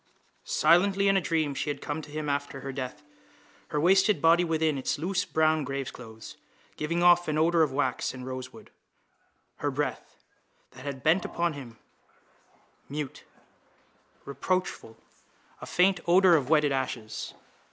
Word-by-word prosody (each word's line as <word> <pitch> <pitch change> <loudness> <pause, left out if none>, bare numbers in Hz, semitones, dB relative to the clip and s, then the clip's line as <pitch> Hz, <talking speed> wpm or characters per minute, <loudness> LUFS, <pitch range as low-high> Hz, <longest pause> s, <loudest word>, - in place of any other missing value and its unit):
Silently, 195 +5 +3
in 195 - +4
a 195 - +3
dream 160 -4 0
she 140 - -3
had 145 - -3
come 155 +2 -4
to 150 - -12
him 150 0 -4
after 140 -1 -3
her 135 - -5
death, 135 +2 -6 0.6
her 150 - -2
wasted 190 +3 +4
body 165 +3 +5
within 160 -2 +1
its 130 - -1
loose 180 +5 -1
brown 155 -1 +2
graveclothes 125 -5 -7 0.4
giving 170 +3 -1
off 175 0 +5
an 155 -1 0
odour 165 +1 +3
of 155 -3 +2
wax 130 -2 -1
and 130 -1 -9
rosewood, 130 0 -8 0.9
her 145 - -1
breath, 140 -1 -4 0.6
that 130 - -13
had 140 -2 -5
bent 170 +4 +3
upon 170 -1 -1
him, 125 -6 -10 1.1
mute, 145 -1 -6 1.0
reproachful, 160 -5 -3 0.6
a - - -7
faint 180 0 +3
odour 180 +1 +6
of 140 -4 0
wetted 150 -2 +4
ashes. 120 -4 -4
150 Hz, 145 wpm, -28 LUFS, 135-170 Hz, 1.1 s, odour